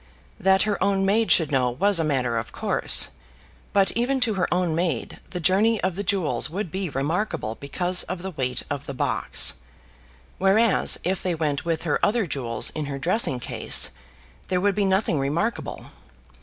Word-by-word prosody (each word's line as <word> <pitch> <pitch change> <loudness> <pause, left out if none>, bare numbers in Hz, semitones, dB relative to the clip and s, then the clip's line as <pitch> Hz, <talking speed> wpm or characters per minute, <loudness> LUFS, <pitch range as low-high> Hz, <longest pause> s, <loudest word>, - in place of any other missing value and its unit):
That 190 -1 +4
her 210 -2 -1
own 195 -1 +2
maid 215 +3 +2
should 160 -4 +4
know 130 -3 +2
was 190 +9 +1
a - - +1
matter 125 -6 0
of 115 - -7
course; - - +1 0.6
but 195 -2 +3
even 255 +4 0
to 230 -3 +2
her 190 -2 -1
own 175 -2 +1
maid 165 -6 -2
the 180 - -5
journey 200 +6 +3
of 185 0 +1
the 195 - -4
jewels 165 -11 0
would 180 0 -4
be 190 0 -2
remarkable 145 - -2
because 175 +6 +1
of 180 -1 -4
the 190 - -4
weight 130 -6 -2
of 145 -1 -5
the 140 - -5
box, - - 0 0.9
whereas 195 +4 +3
if 185 +1 -1
they 180 -2 -1
went 150 0 -2
with 165 -1 -1
her 165 - -1
other 220 0 +2
jewels 120 -8 -2
in 155 - -4
her 140 -1 -4
dressing 165 - +1
case, - - +1 0.6
there 180 -1 0
would 200 +2 +2
be 205 +1 0
nothing 190 -5 +1
remarkable. 165 +12 -3
180 Hz, 180 wpm, -24 LUFS, 145-200 Hz, 0.9 s, That